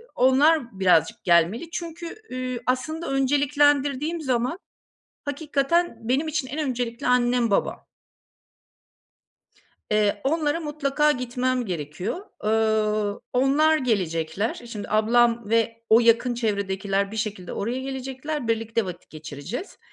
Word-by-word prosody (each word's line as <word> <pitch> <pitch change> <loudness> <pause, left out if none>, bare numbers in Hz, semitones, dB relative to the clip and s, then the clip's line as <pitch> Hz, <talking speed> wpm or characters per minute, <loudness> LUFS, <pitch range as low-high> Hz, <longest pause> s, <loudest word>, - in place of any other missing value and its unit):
onlar 260 -3 +3
birazcık 175 -4 +3
gelmeli. 175 - +2
Çünkü, 340 0 -6 0.2
üüü, 255 -1 -4
aslında 315 +6 -1
önceliklendirdiğim 285 +3 +2
zaman, 255 +3 -1 0.7
hakikaten 295 +3 0
benim 275 +5 +1
için 305 -3 -2
en 285 +5 -5
öncelikli 245 0 -3
annem, 245 -2 +2
babam. 195 - -1 2.0
Eee, 210 -1 +2
onlara 305 +2 +1
mutlaka 300 -1 +1
gitmem 250 0 -1
gerekiyor. 180 - -4 0.3
Ööö, 215 -1 +1 0.2
onlar 285 +5 +4
gelecekler. 190 - -1
E, 240 - -12
şimdi, 210 -3 -6
ablam 230 +1 +3
ve 230 0 +1
o 225 +2 +7
yakın 235 +1 +3
çevredekiler 200 -3 -1
bir 220 - -6
şekilde 205 -4 -4
oraya 235 +5 -2
gelecekler, 265 +1 -4
birlikte 225 -1 0
vakit 180 -2 -8
geçireceğiz. 155 - -7
245 Hz, 110 wpm, -24 LUFS, 215-280 Hz, 2.0 s, o